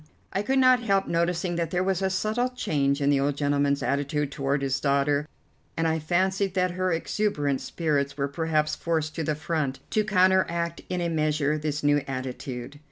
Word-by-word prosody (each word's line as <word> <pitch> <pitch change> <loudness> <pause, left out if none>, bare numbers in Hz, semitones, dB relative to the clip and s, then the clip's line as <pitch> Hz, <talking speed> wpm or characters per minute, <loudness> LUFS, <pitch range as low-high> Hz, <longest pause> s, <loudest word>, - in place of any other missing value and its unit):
I 195 - +1
could 265 +6 0
not 255 -1 +5
help 195 -4 +1
noticing 170 +1 0
that 170 -2 -1
there 180 +1 0
was 190 -1 0
a 190 - +1
subtle 215 +6 0
change 145 - 0
in 140 0 +3
the 140 - +3
old 140 +1 0
gentleman's 140 -1 +1
attitude 145 +1 -1
toward 140 0 -1
his 135 0 0
daughter, 140 +1 +1 0.5
and 165 0 +1
I 160 0 +1
fancied 190 +4 0
that 185 -1 +2
her 185 +1 -1
exuberant 160 -5 0
spirits 145 -4 -1
were 140 -1 0
perhaps 155 +1 0
forced 160 -2 -1
to 165 - -3
the 155 0 0
front, 150 -4 -2
to 215 - +2
counteract 185 -4 +2
in 180 -1 -1
a 170 - 0
measure 155 -2 +1
this 150 -1 -3
new 145 0 +4
attitude. 130 +1 -5
155 Hz, 185 wpm, -26 LUFS, 140-185 Hz, 0.5 s, not